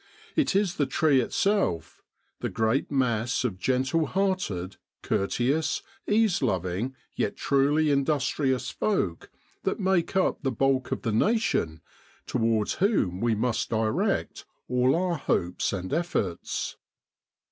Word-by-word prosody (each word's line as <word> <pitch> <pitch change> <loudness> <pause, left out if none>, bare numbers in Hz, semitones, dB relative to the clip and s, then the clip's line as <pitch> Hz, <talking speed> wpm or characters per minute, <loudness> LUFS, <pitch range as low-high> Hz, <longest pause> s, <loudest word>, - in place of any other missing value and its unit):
It 310 -10 +2
is 195 -3 +1
the 145 - +1
tree 155 -6 +3
itself, 195 - 0 0.4
the - - -2
great 110 +4 0
mass 120 -4 0
of 100 -7 -2
gentle 130 +7 +1
hearted, 185 - -1 0.3
courteous, 125 +10 0 0.2
ease 215 -3 +3
loving, 95 +2 -1 0.2
yet 100 - -2
truly 145 +2 +2
industrious 140 -2 0
folk 100 - -1 0.3
that - - -1
make 190 -2 +1
up 190 - +1
the 135 -4 0
bulk 135 +2 +1
of - - -2
the 115 - 0
nation, 110 - +1 0.4
towards 115 -3 +1
whom 145 - +2
we 115 -1 +2
must 115 +2 -1
direct 110 -1 0 0.2
all 125 +2 +3
our 175 -1 0
hopes 90 -9 0
and 95 -2 -4
efforts. 155 - -2
130 Hz, 125 wpm, -27 LUFS, 110-170 Hz, 0.4 s, tree